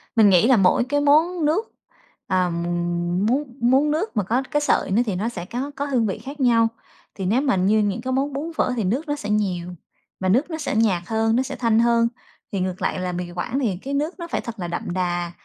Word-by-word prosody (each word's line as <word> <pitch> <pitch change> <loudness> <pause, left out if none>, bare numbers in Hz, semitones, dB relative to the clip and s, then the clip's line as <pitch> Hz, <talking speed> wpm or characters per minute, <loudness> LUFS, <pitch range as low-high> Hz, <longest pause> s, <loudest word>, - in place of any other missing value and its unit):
Mình 220 -3 +6
nghĩ 185 +3 +5
là 255 -2 +5
mỗi 195 +4 +4
cái 290 +4 0
món 315 +4 +3
nước, 345 +10 0 0.6
ờ, 185 -1 +1
m 170 0 -3 0.6
món 265 +6 +2 0.2
món 265 +5 +3
nước 315 - -2
mà 210 - +2
có 235 +8 0
cái 295 - +1
sợi 290 - +1
nó 215 +5 +3
thì 205 -5 -2
nó 210 +6 -1
sẽ 180 -7 -6
có 255 +8 -4
có 285 - -2
hương 255 -5 +1
vị 190 - -2
khác 280 +2 -9
nhau. 235 -3 +4 0.5
Thì 190 - -4
nếu 225 +8 +2
mà 275 -5 +2
như 195 +4 +3
những 205 +2 0
cái 260 +1 -2
món 275 +2 0
bún, 300 +5 -4
phở 250 - +1
thì 225 - -1
nước 250 - -1
nó 290 - -1
sẽ 210 -8 -6
nhiều, 180 -4 -1 0.4
và 185 - 0
nước 255 - +2
nó 320 - -4
sẽ 305 -7 -3
nhạt 205 -6 +2
hơn, 225 0 +1
nó 255 - +2
sẽ - - -6
thanh 230 -2 +2
hơn, 235 0 +3 0.4
thì 195 - -2
ngược 185 0 -3
lại - - -1
là 185 0 -2
mì 175 0 -5
Quảng 205 +10 -3
thì 215 -9 -1
cái 270 +9 -6
nước 305 +6 -2
nó 340 - -5
phải - - -2
thật 235 -2 -8
là 175 - -3
đậm 175 0 -4
đà, 175 -1 -1
230 Hz, 255 wpm, -22 LUFS, 185-280 Hz, 0.6 s, Mình